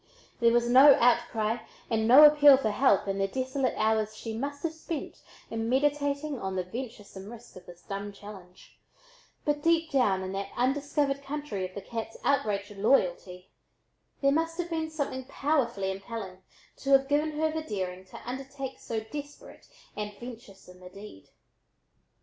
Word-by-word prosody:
There 235 -1 +4
was 240 0 +2
no 265 +3 +8
outcry 235 -2 +2 0.3
and 220 -2 0
no 265 +6 +9
appeal 295 -2 +8
for 220 -5 -1
help 205 -3 +3
in 195 0 -2
the 195 - +1
desolate 260 +3 -2
hours 215 0 0
she 225 0 -6
must 285 +4 -5
have 330 -1 -1
spent 320 -1 -6 0.3
in 225 0 -2
meditating 285 +1 0
on 190 0 -4
the 185 - -1
venturesome 205 -2 -8
risk 235 0 -12
of 185 -1 -13
this 175 0 -13
dumb 200 +1 -5
challenge, 195 -3 -14 0.7
but 295 0 0
deep 330 0 +2
down 205 -9 +2
in 185 - -5
that 195 0 -4
undiscovered 280 +2 0
country 275 -10 -4
of 185 - -21
the 200 - -6
cat's 225 -1 -6
outraged 210 -7 0
loyalty, 185 -4 0 0.7
there 275 - +5
must 330 +2 0
have 350 -1 -4
been 320 -1 -2
something 280 -4 -4
powerfully 255 -9 0
impelling 195 -1 -7 0.4
to 275 - -6
have 270 0 +5
given 300 +2 +1
her 315 0 +1
the 320 0 -3
daring 185 -9 -4
to - - -11
undertake 270 +1 -6
so 225 -1 -4
desperate 290 +6 -10 0.3
and 210 -1 -5
venturesome 220 -7 -12
a 180 - -11
deed. 195 - -13
240 Hz, 160 wpm, -28 LUFS, 200-285 Hz, 0.7 s, no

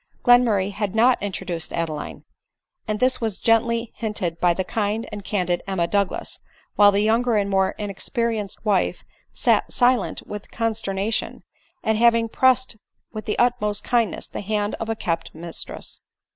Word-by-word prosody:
Glenmurray 230 -6 +4
had 205 0 -3
not 240 +3 +4
intro 200 -3 -4
duced 170 -2 -5
Adeline; 160 -3 -4 0.6
and 215 -1 -1
this 255 0 +2
was 220 -4 -1
gently 230 0 +2
hinted 185 -7 -3
by 175 - +4
the 190 +2 -1
kind 215 +3 -2
and 205 -1 -6
candid 180 -3 -1
Emma 190 -3 0
Douglas; 200 +2 -1 0.4
while 205 -1 +7
die 200 - 0
younger 225 +2 +2
and 200 -1 0
more 190 -1 +2
inexperienced 210 +1 -3
wife 200 -3 +1 0.3
sat - - +1
silent 245 0 +2
with 210 -1 -8
consternation, 220 -2 -2 0.4
at 220 0 +1
having 230 0 +4
pressed 255 -1 +2 0.4
with 215 -2 -6
the 210 - -2
utmost 225 -4 +1
kindness 235 -3 0
the - - -6
hand 205 0 -1
of 225 - -4
a 225 - 0
kept 165 -6 -3
mis 165 +1 -6
tress. - - -7
210 Hz, 160 wpm, -23 LUFS, 195-230 Hz, 0.6 s, while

